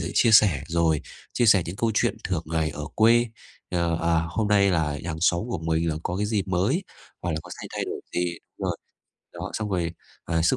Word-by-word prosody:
sẽ 85 - -3
chia 115 - +5
sẻ, 100 -10 +6
rồi, 80 -2 +2 0.3
chia 120 - +2
sẻ 95 -5 +6
những 90 +4 -5
câu 115 0 +1
chuyện - - +2
thường - - -1
ngày 80 -1 0
ở 75 0 -6
quê, 115 +2 +5 0.4
ờ, 85 -2 0
à, 85 -1 +2
hôm 105 +4 -1
nay 100 -2 +4
là 75 -4 0
hàng 80 -2 -4
xóm 85 0 +3
của 95 - -2
mình 80 +1 0
là 75 - 0
có 90 - -2
cái 105 +1 0
gì 105 -2 0
mới, 95 - +1 0.4
hoặc 90 - -1
là - - -2
có - - -13
xay - - -6
thay - - -1
đổi - - -5
gì 85 -1 0 0.2
đúng - - -2
rồi. - - -1 0.6
Đó, - - -5
xong 105 -2 -3
rồi, 85 -3 -1 0.3
ờ, 80 -1 0
sức 105 +10 +3
85 Hz, 235 wpm, -25 LUFS, 80-105 Hz, 0.6 s, sẻ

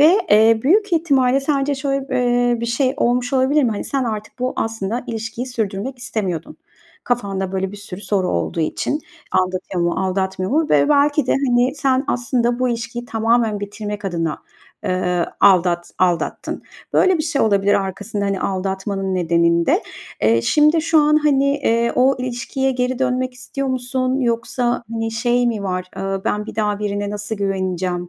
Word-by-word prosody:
Ve, 325 +6 +7
eee, 220 +1 +6
büyük 400 +7 +3
ihtimalle 275 -5 +3
sence 280 0 0
şöyle 275 0 -2
b 260 - -1
eee, 245 -1 +2
bir 235 - -2
şey 255 +3 +1
olmuş 245 +1 +1
olabilir 270 +3 +3
mi? 240 - +2
Hani, 210 - -3
sen 270 -2 -1
artık 215 -1 -5
bu 255 +1 -1
aslında 225 +1 -2
ilişkiyi 230 +2 -4
sürdürmek 230 +1 -3
istemiyordun. 190 -9 -4 0.5
Kafanda 195 -6 -2
böyle 190 +1 -2
bir - - -8
sürü 200 -2 -8
soru 190 -2 0
olduğu 85 - -1
için, 285 - -1 0.3
aldatıyor 185 -1 0
mu, 170 - +1
aldatmıyor 190 +2 -2
mu? 315 +1 +2
Ve - - +4
belki 290 -1 +3
de, - - +2
hani, 255 -1 +2
sen 270 -1 +1
aslında 245 0 0
bu 255 0 +1
ilişkiyi 240 +1 -4
tamamen 225 -2 +1
bitirmek 205 0 -6
adına, 165 -4 -2 0.5
eee, 180 -1 0
aldat 175 -3 +4
aldattın. 175 -2 -1 0.3
Böyle 370 -3 +4
bir - - 0
şey 295 -3 0
olabilir 200 -2 +3
arkasında, 200 +2 -2
hani, 195 -1 -1
aldatmanın 195 0 -2
nedeninde. 170 -1 +2 0.4
Eee, 115 +1 +3
şimdi 305 +2 +4
şu 325 -1 +3
an, 300 0 +4
hani, 290 -3 +3
eee, 235 -3 +1
o 265 +2 +3
ilişkiye 255 +2 -2
geri 250 0 -1
dönmek 255 -1 0
istiyor 270 +1 -4
musun, 255 +1 -1
yoksa, 240 0 0
hani, 225 0 -2
şey 240 +2 +1
mi 220 -4 -1
var, 185 -1 -2
eee, 195 0 -2
ben 210 +1 -1
bir - - -8
daha 210 -2 0
birine 205 -1 -2
nasıl 210 +1 -4
güveneceğim, 185 -2 -2
230 Hz, 165 wpm, -20 LUFS, 195-260 Hz, 0.5 s, Ve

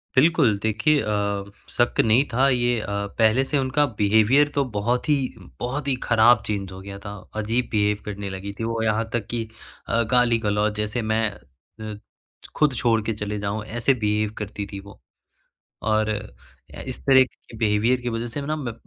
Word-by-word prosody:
बिल्कुल। 130 -6 +4
देखिए 110 +8 +2
अ, 100 -1 -1 0.3
शक 120 0 0
नहीं 115 +4 +5
था 130 +3 +4
ये 120 -2 +1
अ, - - -5 0.3
पहले 115 +3 +4
से 145 - 0
उनका 135 +2 +2
बिहेवियर 110 +8 +4
तो 140 - +3
बहुत 120 +5 0
ही 150 - +5 0.4
बहुत 130 +4 -3
ही 135 - +2
ख़राब 115 0 +5
चेंज 100 -3 -3
हो 95 - -9
गया 100 0 -8
था। 100 - -5 0.3
अजीब 115 +3 0
बिहेव 105 -1 +2
करने 100 -1 -5
लगी 95 +1 -6
थी। - - -2
वो 115 0 -1
यहाँ 110 +1 0
तक 120 -3 -1
की 120 -1 -2 0.4
अ, 115 - +2
गाली-गलौच 110 -4 +2
जैसे 105 +3 -1
मैं 110 0 +1
अ, 105 - -11 0.5
छ - - -11
खुद 150 -3 +3
छोड़ 115 -1 +2
के 115 - 0
चले 105 0 -4
जाऊँ, 100 +1 -3
ऐसे 120 +4 +1
बिहेव 105 -3 0
करती 105 -1 -5
थी 100 - -6
वो। 100 -7 -14 0.8
और 110 0 +1
अ, 105 0 -8
इस - - -5
तरह 130 -1 +7
के 125 -2 -13
बिहेवियर 110 +3 +2
की 120 - -2
वज़ह 115 +1 -3
से 120 +5 -5
ना 150 +2 -2
मैं 130 -7 -4
110 Hz, 185 wpm, -24 LUFS, 105-125 Hz, 0.8 s, तरह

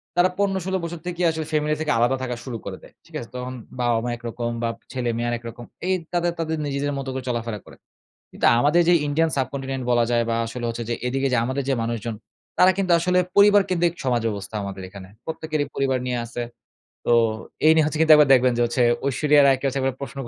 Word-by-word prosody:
তারা 175 +1 +4
১৫- 195 -1 +1
১৬ 190 0 0
বছর 170 0 -5
থেকেই 180 0 -1
আসলে 160 -1 -4
ফ্যামিলি 150 0 +1
থেকে 155 - 0
আলাদা 120 +3 +3
থাকা 125 -1 -3
শুরু 120 -4 -5
করে - - -5
দেয়। - - -16
ঠিক - - -15
আছে? 115 - -9
তখন 125 0 -5 0.3
বাবা-মা 120 -1 +1
একরকম 120 0 -4
বা, 115 - +1 0.2
ছেলে-মেয়ে 120 -2 -2
আরেকরকম। 120 0 -6 0.2
এই 190 - +2 0.2
তাদের 175 0 +1
তাদের 160 -1 -1
নিজেদের 145 0 -2
মতো 135 -1 -5
করে 130 -1 -4
চলাফেরা 115 -3 -3
করে। - - -14 0.6
কিন্তু - - -2
আমাদের 150 +6 +4
যে 175 - +6
ইন্ডিয়ান 160 +3 +1
subcontinent 135 0 -3
এ - - -3
বলা 120 -1 +3
যায় 120 -1 +2
বা, 115 - +1
আসলে 120 +1 -5
হচ্ছে 115 0 -4
যে 120 - 0
এদিকে 135 +2 0
যে - - +3
আমাদের 130 +2 -2
যে - - +3
মানুষজন, 115 -1 -3 0.4
তারা 185 +1 +6
কিন্তু 190 -2 0
আসলে 180 +2 +2 0.2
পরিবারকেন্দ্রিক 195 -4 +4
সমাজ 125 -3 +1
ব্যবস্থা 100 -1 -5
আমাদের 100 -1 -6
এখানে। 95 -1 -11 0.2
প্রত্যেকেরই 155 -2 -2
পরিবার 135 -1 +1
নিয়া 125 -1 -1
আছে। 120 +1 -6 0.6
তো - - +1 0.5
এই 155 - +8
নিয়ে 160 -1 +4
হচ্ছে 155 0 -2
কিন্তু 160 -1 +7
একবার 150 -2 +5
দেখবেন 125 -1 +4
যে - - +1 0.4
ঐশ্বরিয়া 145 +2 +4
রায়কে 135 -1 +2
হচ্ছে 135 0 -1
একবার 130 -1 -1
প্রশ্ন 140 -1 -7
135 Hz, 210 wpm, -23 LUFS, 120-160 Hz, 0.6 s, এই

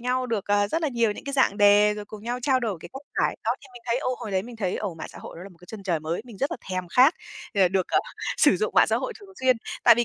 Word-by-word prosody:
nhau 255 +1 0
được, 225 -5 -2
ờ, 205 0 +2
rất 325 +7 -1
là 310 - +2
nhiều 235 -5 +1
những - - -10
cái 280 - -4
dạng 265 -7 +3
đề, 205 0 +6
rồi 210 0 -6
cùng 210 0 -11
nhau 240 +2 -3
trao 260 -2 +2
đổi 215 -6 -2
cái - - -9
cách 270 +2 -8 0.2
giải. - - +1
Đó, - - +1
thì - - -17
mình 245 - -12
thấy, 235 +2 +1
ô, 255 -1 -1
hồi 210 - -6
đấy 190 -1 0
mình 235 +1 -10
thấy, 190 -4 -1
ồ, 200 -5 -3
mạng 160 - -7
xã - - -12
hội - - -10
đó 175 - -9
là 195 - -9
một 180 - -19
cái 180 - -17
chân 220 -3 -8
trời 175 -5 0
mới, 160 +4 -3
mình 235 -5 -12
rất 275 - 0
là - - -3
thèm 185 -1 -3
khát 260 - +5 0.4
để 190 -3 +5
được, 190 -1 0
ờ, - - +3 0.4
sử - - +5
dụng 435 - -2
mạng - - +6
xã - - +1
hội - - -3
thường 400 - -14
xuyên. 255 -2 +4 0.3
Tại 235 - +9
vì 240 +1 +1
215 Hz, 330 wpm, -25 LUFS, 195-255 Hz, 0.4 s, Tại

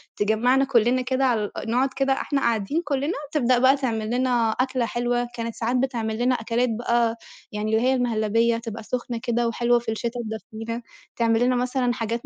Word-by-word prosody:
تجمّعنا 245 +6 +2
كُلِّنا 245 +1 +3
كده 260 +1 0
على 220 -5 +1 0.2
نقعد 255 +4 +2
كده 270 0 +2
إحنا 275 +1 -1
قاعدين 230 - 0
كُلِّنا، 285 +3 -1 0.2
تبدأ 255 -4 +3
بقى 260 +2 +5
تعملِّنا 240 -1 0
أكلة 255 0 0
حلوة، 240 +1 -1
كانت 230 -1 -4
ساعات 235 +2 -1
بتعملِّنا 245 -1 0
أكلات 235 +2 0
بقى 235 0 +1 0.3
يعني 210 +1 -2
اللي 220 - +2
هي 265 - +4
المهلبية 230 -1 +1
تبقى 225 -1 -7
سُخنة 240 +1 -3
كده 240 -1 0
وحلوة 240 +1 +2
في 230 - -4
الشتا 235 +2 -3
تدفِّينا، 225 +2 -6 0.3
تعمل 230 -1 +2
لنا 255 - +2
مثلًا 250 0 0
حاجات 230 0 -3
240 Hz, 165 wpm, -24 LUFS, 225-255 Hz, 0.3 s, بقى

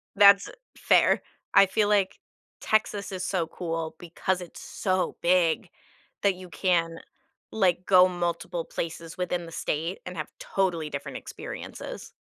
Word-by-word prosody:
That's 200 0 +7 0.3
fair. - - +4 0.3
I - - +8
feel 205 +2 +1
like 200 -2 +2 0.4
Texas 210 -2 0
is 185 -1 -3
so 175 -4 0
cool, 165 -2 -4
because 180 +2 -2
it's 175 - -10
so 185 -1 -1
big 170 -2 +2 0.5
that 200 -2 +3
you 180 -1 -11
can, 165 0 0 0.5
like, 185 -4 +2
go 185 -1 +7
multiple 175 -1 -2
places 165 0 -5
within 180 -1 -2
the 165 - -10
state 165 +3 -2
and 180 - -6
have 155 - -4
totally 175 -5 -1
different 140 -1 -5
experiences. - - -8
180 Hz, 135 wpm, -27 LUFS, 165-190 Hz, 0.5 s, I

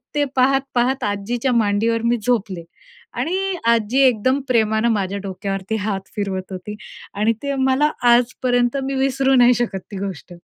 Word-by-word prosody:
ते 290 - +2
पाहत-पाहत 265 -1 +1
आजीच्या 225 +5 -1
मांडीवर 225 +1 +1
मी 235 +1 +2
झोपले 205 -8 -1 0.5
आणि 380 +2 -1
आजी 235 +2 +2
एकदम 255 +3 +1
प्रेमानं 220 -1 +2
माझ्या 200 -2 -1
डोक्यावरती 195 +1 -4
हात 205 -2 -2 0.2
फिरवत 195 -2 -4
होती 190 +3 -7 0.4
आणि 215 +3 +2
ते 280 -1 -2
मला 265 +3 +2 0.2
आजपर्यंत 245 +1 +2
मी 270 +1 -3
विसरू 270 0 +1
नाही 245 0 +6
शकत 225 -5 -2
ती 200 - -6
गोष्ट. 190 -3 -6
235 Hz, 145 wpm, -20 LUFS, 205-260 Hz, 0.5 s, नाही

